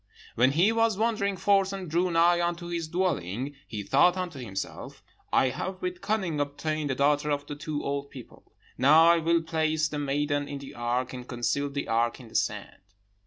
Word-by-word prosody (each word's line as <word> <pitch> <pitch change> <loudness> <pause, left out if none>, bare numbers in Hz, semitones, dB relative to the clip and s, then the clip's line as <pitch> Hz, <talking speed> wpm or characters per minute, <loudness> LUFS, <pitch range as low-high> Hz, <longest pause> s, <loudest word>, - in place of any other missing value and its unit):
"When 125 +4 +3
he 180 +8 +4
was 225 -2 +2
wandering 215 -3 0
forth 195 -1 +3
and 195 -2 -5
drew 175 +3 +1
nigh 170 +1 +4
unto 175 0 -2
his 170 -2 -3
dwelling, 145 - -2
he 105 -3 -5
thought 175 - +4
unto 175 -6 -4
himself, 95 -6 -6 0.3
'I 130 - +3
have 185 +8 -5
with 360 0 -3
cunning 190 -8 -1
obtained 145 +1 -2
the 130 - 0
daughter 145 +2 +2
of 145 -1 -1
the 145 - -6
two 150 0 -4
old 140 0 -3
people. 130 -4 -13 0.3
Now 155 +5 +7
I 170 - +4
will 165 +1 +2
place 160 -1 0
the 150 -1 -4
maiden 145 0 -1
in 140 - -5
the 140 0 -10
ark, 120 +2 -2
and 125 -1 -8
conceal 135 +4 -1
the 140 0 -4
ark 115 +2 0
in 120 -3 -12
the - - -16
sand.' - - -2
150 Hz, 195 wpm, -27 LUFS, 140-175 Hz, 0.3 s, Now